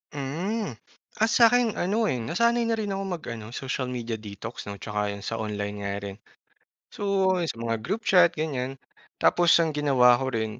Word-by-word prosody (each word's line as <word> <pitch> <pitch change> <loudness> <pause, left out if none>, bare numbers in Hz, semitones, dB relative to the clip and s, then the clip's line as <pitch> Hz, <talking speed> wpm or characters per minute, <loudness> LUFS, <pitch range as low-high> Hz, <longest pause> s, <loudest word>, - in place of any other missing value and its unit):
Mm. 155 - -3 0.5
Ah, - - +5
sa'kin 235 0 +5
ano, 205 +6 +1
eh, 130 - 0
nasanay 235 - +1
na 230 - +1
rin 210 -2 -3
ako 195 0 -2
mag 160 - -12
ano, 110 -2 -7
social 130 -1 -3
media 120 -3 -4
detox 105 +2 -8
'no 100 - -5
tsaka 105 +1 -3
yun 100 - -10
sa 115 +2 -3
online 105 -1 -3
nga 100 0 -3
rin. 100 -1 -6 0.8
So, 195 -2 +1 0.2
sa - - -3
mga 115 -1 -2
group 200 - -3
chat, 180 -4 +5
ganyan. 135 -4 -3 0.5
Tapos 175 -1 +5
ang 160 - -1
ginawa 130 -5 +4
ko 135 - -2
rin 110 -1 -3
135 Hz, 180 wpm, -26 LUFS, -, 0.8 s, Ah